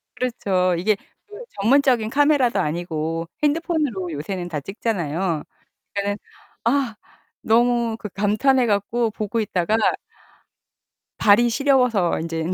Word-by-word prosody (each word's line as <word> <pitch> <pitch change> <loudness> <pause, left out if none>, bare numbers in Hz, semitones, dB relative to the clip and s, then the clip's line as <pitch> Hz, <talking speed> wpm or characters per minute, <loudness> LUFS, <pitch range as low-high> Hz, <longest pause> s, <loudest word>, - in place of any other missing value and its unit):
그렇죠. 190 -7 0
이게 210 +5 +2 0.3
그 415 +3 -11 0.2
전문적인 245 -1 +3
카메라도 280 -5 +3
아니고 165 -1 -2 0.2
핸드폰으로 295 - 0
요새는 175 +4 -4
다 155 -3 -3
찍잖아요. 175 -3 -2 0.5
그니까는 200 0 -1 0.5
아 245 -2 +1 0.5
너무 235 0 +2
그 210 - -7
감탄해 215 +7 +2
갖고 220 +2 0
보고 215 +2 -3
있다가 205 -2 0 1.4
발이 225 +3 +5
시려워서 250 -8 +2
인제는 165 +1 -3
215 Hz, 275 characters per minute, -22 LUFS, 180-245 Hz, 1.4 s, 발이